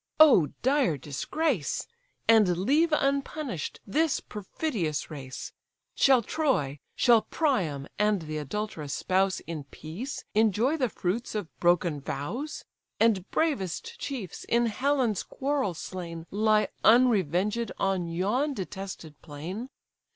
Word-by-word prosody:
O 270 - +8 0.2
dire 260 - +3
disgrace! 165 - -2 0.4
And 210 -6 +5
leave 290 - +3
unpunish'd 275 - -1
this 310 +7 +1
perfidious 195 - -3
race? 135 -4 -7 0.4
Shall 260 -3 +5
Troy, 205 - 0 0.2
shall 235 -3 +5
Priam, 185 - 0
and 210 -4 +2
the 155 0 -4
adulterous 150 -2 -4
spouse, 190 0 +1
In 160 -4 -6
peace 170 - -7
enjoy 220 +6 +3
the 255 -5 +1
fruits 215 +5 -2
of 205 -6 -4
broken 175 -4 +2
vows? 220 - -4 0.3
And 215 -4 +3
bravest 215 - -1
chiefs, 240 - -5
in 235 0 +2
Helen's 250 -1 +1
quarrel 270 -9 -1
slain, 170 -1 -6
Lie 215 +1 +3
unrevenged 215 - +3
on 190 -3 0
yon 210 - 0
detested 190 - -7
plain? 175 - -6
210 Hz, 115 wpm, -28 LUFS, 170-260 Hz, 0.4 s, O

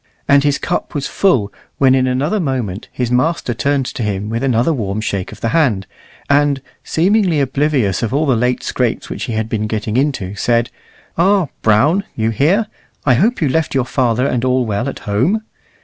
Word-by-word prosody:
And 140 0 +5
his 145 -1 +2
cup - - -3
was 140 -2 -2
full 125 - +1 0.2
when 130 -1 +4
in 130 -1 +2
another 140 +11 0
moment 125 - -3
his 125 -1 -2
master 130 +1 +1
turned 140 +3 0
to 125 - -5
him 105 -1 -2
with 115 +1 -2
another 130 +3 +2
warm 105 -6 -2
shake 100 -4 -3
of - - -12
the 115 - 0
hand, 115 -11 +1 0.4
and, 140 -1 +3 0.2
seemingly 185 -1 +2
oblivious 135 - +1
of 115 - -1
all 145 +4 +1
the 135 -4 +2
late 125 +2 0
scrapes - - -2
which - - -4
he 115 - -4
had 110 0 -1
been 110 -1 -2
getting 110 +1 -2
into, 130 -9 -1
said, 115 +3 0 0.5
"Ah, 190 -3 +3
Brown, 145 - +3
you 110 0 0
here! 170 - +2 0.4
I 130 - +5
hope 205 - +2
you - - +3
left 155 +2 0
your 130 -2 +2
father 125 -1 +1
and 125 -3 0
all 130 -1 +2
well 110 +4 -1
at - - -7
home?" 135 - +1
130 Hz, 195 wpm, -17 LUFS, 110-145 Hz, 0.5 s, And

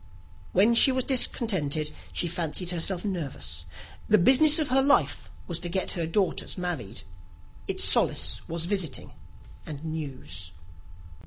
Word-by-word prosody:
When 205 +6 +3
she 250 +3 +7
was 260 0 -1
discontented, 180 - +2 0.2
she 175 - -1
fancied 170 +1 -2
herself 175 +2 -1
nervous. 130 - -4 0.4
The 215 - +4
business 270 - +5
of 310 -4 -1
her 265 +1 +3
life 280 +1 +1 0.2
was 170 -2 -3
to 175 - -5
get 185 +2 -2
her 170 -2 -3
daughters 190 +3 -2
married: 130 - -5 0.6
its - - -1
solace - - +2
was 165 0 -3
visiting 180 -6 -2 0.5
and 150 0 -9
news. 130 - -6
175 Hz, 135 wpm, -26 LUFS, 150-210 Hz, 0.6 s, she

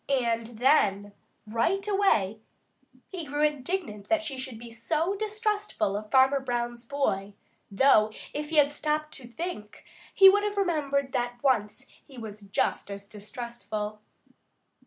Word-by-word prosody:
And 235 -3 0
then 205 -6 +3 0.3
right 335 - 0
away 305 - +2 0.7
he 365 -4 -5
grew 295 0 -2
indignant 295 - -2
that 325 -1 +2
she 295 -4 -4
should 260 -3 -6
be 235 +1 -10
so 310 - -1
distrustful 420 - -1
of 210 +1 -5
Farmer 265 +2 +5
Brown's 240 -2 -3
boy, 205 -7 -1 0.3
though 215 0 +4 0.2
if 295 0 -4
he 325 - -2
had 290 -1 +6
stopped 305 +1 -2
to 250 - -9
think, 240 -6 -6 0.3
he 390 - +8
would 405 +2 +7
have 415 -1 -2
remembered 285 -8 0
that 245 -2 -2
once 235 -2 +1 0.2
he 270 - -16
was 215 -2 -8
just 200 0 -1
as 200 0 -7
distrustful. 215 0 -6
260 Hz, 140 wpm, -28 LUFS, 215-310 Hz, 0.7 s, he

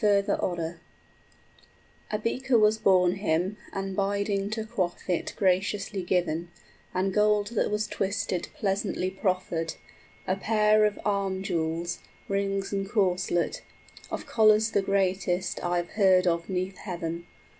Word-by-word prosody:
} - - -12
A 190 -5 +1 1.4
beaker 255 +2 +1
was 215 0 +4
borne 185 -3 +4
him, 190 +1 0
and 195 -1 -4
bidding 200 0 0
to 220 0 -3
quaff 185 -5 -3
it 180 -3 -1
Graciously 195 +1 +1
given, 175 -2 0 0.4
and 190 +1 0
gold 210 0 +3
that 235 - 0
was 210 +1 0
twisted 195 -3 -2
Pleasantly 195 -6 -1
proffered, 185 -4 -1 0.5
a 185 - +1
pair 215 +1 +3
of 210 -1 -1
arm 195 -2 0
jewels, 170 -2 -2 0.3
Rings 195 0 -1
and 195 0 -2
corslet, 185 -4 +1 0.5
of - - -4
collars 220 0 +4
the 200 - +2
greatest 190 -2 0
5 175 - -2
I've 175 -1 0
heard 190 -3 +4
of 170 0 0
'neath 185 0 -2
heaven. 170 -3 -5
195 Hz, 130 wpm, -27 LUFS, 180-205 Hz, 1.4 s, was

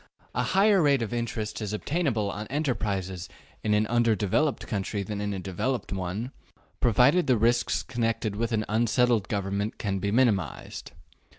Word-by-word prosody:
A - - 0
higher 195 0 +4
rate 140 -5 +3
of 115 - -4
interest 115 -2 -3
is 105 -1 -3
obtainable 115 - -1
on 105 +2 -6
enterprises 100 - -2 0.3
in 105 -1 +2
an 105 +1 +2
undeveloped 115 +4 +1
country 100 0 -2
than 105 +1 -4
in 105 0 -2
a 100 - -3
developed 100 +6 -3
one, 95 +6 -3 0.5
provided 125 - +4
the 130 -3 +4
risks 120 +2 +2
connected 115 -4 -1
with 115 +2 -1
an 110 -2 0
unsettled 115 -1 +2
government 100 +1 -2
can 100 -2 -2
be 100 - -1
minimized. 105 - 0
110 Hz, 155 wpm, -27 LUFS, 100-120 Hz, 0.5 s, higher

